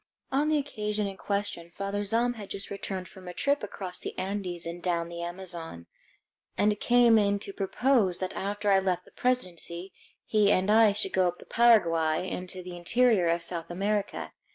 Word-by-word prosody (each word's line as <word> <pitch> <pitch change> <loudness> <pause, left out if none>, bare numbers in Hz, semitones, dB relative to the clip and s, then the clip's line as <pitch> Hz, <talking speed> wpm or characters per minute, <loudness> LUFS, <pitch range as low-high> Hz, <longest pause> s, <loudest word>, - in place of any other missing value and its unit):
On 280 +3 +2
the 310 - +3
occasion 210 -7 -2
in 195 -1 -4
question 200 -4 -3
Father 200 +3 -3
Zahm 235 +4 +1
had 210 -4 -9
just 200 0 -5
returned 190 -2 -4
from 185 -2 -13
a 180 - -7
trip 285 0 +1
across 190 -3 -6
the - - -6
Andes 185 -3 -3
and 170 +1 -6
down 170 -2 -1
the 170 0 -6
Amazon, 170 - -6 0.7
and 210 0 +2
came 240 -2 +5
in 200 -1 +2
to 200 0 -8
propose 200 -1 +2
that 185 -1 -3
after 205 +1 -1
I 195 - +6
left 180 -2 -1
the - - -18
presidency 185 -7 -2 0.3
he 210 -2 +3
and 190 +3 +3
I 220 -1 +6
should 200 -2 -2
go 185 -1 +3
up 175 0 -2
the - - -14
Paraguay 170 -8 +3
into 185 0 -5
the 180 0 -7
interior 210 +1 +3
of 170 0 +1
South 170 -1 -4
America. 200 +3 -2
195 Hz, 185 wpm, -28 LUFS, 175-210 Hz, 0.7 s, I